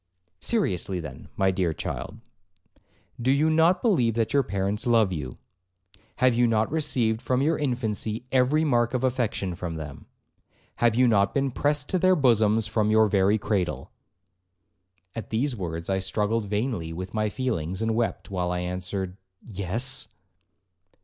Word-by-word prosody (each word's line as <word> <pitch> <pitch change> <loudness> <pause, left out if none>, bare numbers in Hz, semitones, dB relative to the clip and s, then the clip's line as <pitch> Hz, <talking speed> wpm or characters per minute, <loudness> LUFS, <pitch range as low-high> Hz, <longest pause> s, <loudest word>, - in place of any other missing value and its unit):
'Seriously, 95 - 0
then, 75 -5 -9
my 95 0 +2
dear 90 -3 0
child, - - -5 1.0
do 125 - 0
you 150 +4 +3
not 165 +6 +3
believe 125 - +2
that 115 -1 0
your 140 - +5
parents 100 -1 -2
love 110 -5 +3
you? 65 -7 -5 0.8
Have 130 0 +3
you 120 +1 +3
not 110 0 +1
received 130 -8 0
from 130 +1 0
your 160 +3 +2
infancy 120 -4 -2
every 135 +4 +3
mark 120 -4 +1
of 125 - -1
affection 120 -7 -1
from 85 -1 -5
them? 75 -3 -8 0.7
Have 120 -2 +3
you 125 +1 +4
not 100 -3 +2
been 135 -1 +1
pressed 145 +2 0
to 185 - +1
their 185 +1 +4
bosoms 110 - +3
from 110 -1 0
your 110 0 +5
very 100 +1 +3
cradle?' 100 -4 -2 1.2
At 115 - -7
these 125 +4 0
words 85 -4 -5
I 95 0 0
struggled 105 +3 -1
vainly 105 -5 -2
with 90 +3 -6
my 110 -1 0
feelings, 95 - -2
and 110 0 +1
wept, 115 -2 -2
while 90 -2 -1
I 90 0 -1
answered, 90 +1 -4 0.3
'Yes.' 115 +7 -1
110 Hz, 155 wpm, -26 LUFS, 95-130 Hz, 1.2 s, your